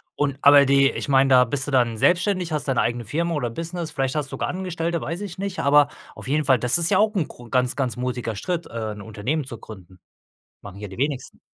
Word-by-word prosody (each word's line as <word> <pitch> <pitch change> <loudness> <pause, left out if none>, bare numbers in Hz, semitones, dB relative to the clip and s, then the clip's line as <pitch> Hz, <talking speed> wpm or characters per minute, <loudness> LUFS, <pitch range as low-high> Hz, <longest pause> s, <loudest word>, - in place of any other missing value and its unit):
Und 140 -2 -1
aber 140 0 +7
die 140 0 +4
ich - - -5
meine, 135 0 +4
da 130 -1 +7
bist 135 +3 -3
du 145 - -3
dann 120 -4 +2
selbstständig, 180 - +1
hast 150 -1 -2
deine 135 -3 +1
eigene 120 0 -2
Firma 170 +9 -1
oder 135 -6 -1
Business, 165 +5 -5
vielleicht 135 0 -2
hast 150 -2 -1
du - - -14
sogar - - -3
Angestellte? 170 -2 -3
Weiß 170 +5 -4
ich 190 -3 -7
nicht. 195 -1 -4
Aber, 145 +1 +5 0.3
auf - - -10
jeden 150 +2 0
Fall, 130 -3 +4
das 125 +5 +3
ist 170 0 +2
ja 185 - +4
auch 215 0 +3
'n 175 -6 0
gro 120 -1 -14
ganz, 125 -1 +1
ganz 125 -3 -2
mutiger 125 -3 -3
Schritt, 170 - -3
äh, 110 -2 -5
'n 105 0 -8
Unternehmen 110 +9 -3
zu 125 -3 -8
gründen. 95 -4 -13 0.6
Machen 100 -2 -10
hier 105 0 -7
die 95 - -11
wenigsten. 140 -1 -3
140 Hz, 245 wpm, -23 LUFS, 120-165 Hz, 0.6 s, aber